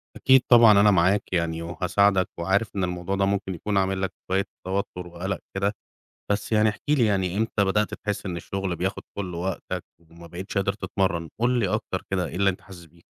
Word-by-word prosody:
أكيد 130 -1 +5
طبعًا 120 -2 +9
أنا 105 0 +6
معاك 95 +2 +2
يعني 85 -2 0
وهاساعدك، 95 +3 +1
وعارف 100 +5 0
إن 95 - 0
الموضوع 90 +2 -2
ده 100 0 +2
ممكن 95 -1 -1
يكون 100 +4 -2
عامل 95 0 +1
لك 95 - -2 0.2
شوية 95 +1 +2 0.2
توتر 95 -2 -3
وقلق 90 +3 -4 0.2
كده، 100 +1 0 0.6
بس 100 +2 -1
يعني 110 0 +4
احكِ 105 0 -4
لي 145 -5 +4
يعني 95 -3 0
إمتى 110 -1 +1
بدأت 105 +2 +1
تحِسّ 105 0 -4
إن 90 -2 -3
الشُّغل 95 +1 -3
بياخد 95 +4 -2
كُلّ 95 -3 -4
وقتك، 90 0 -4 0.2
وما 85 +1 -15
بقتيش 90 +5 -8
قادر 100 0 +1
تتمرن؟ 95 -4 -2
قُل 120 +1 +2
لي 105 -5 +1
أكتر 105 -2 -2
كده 95 -2 0
إيه 85 - -7
اللي 100 +1 +3
أنت 90 - -8
حاسِس 95 -3 -13
بيه. 85 +1 -22
95 Hz, 200 wpm, -25 LUFS, 90-100 Hz, 0.6 s, طبعًا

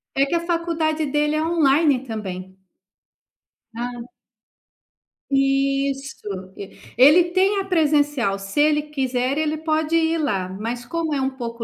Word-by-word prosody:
É 275 - +3
que - - 0
a 335 - -5
faculdade 320 -2 -1
dele 295 +2 0
é 310 - 0
online 300 -4 +2
também. 210 -6 -5 1.3
Hã. 240 0 -5 1.3
Isso. 275 -8 -1
E 200 - -10 0.2
ele 300 +8 +7
tem 390 +2 +2
a 390 - -3
presencial, 290 - +1
se 195 +7 -5
ele 300 0 +3
quiser 265 -2 -2
ele 310 0 0
pode 315 +1 -1
ir 325 0 +2
lá, 195 - -1
mas 230 +6 -5
como 330 0 -2
é 275 - -1
um 265 - +1
pouco 235 -3 -6
280 Hz, 140 wpm, -22 LUFS, 245-315 Hz, 1.3 s, ele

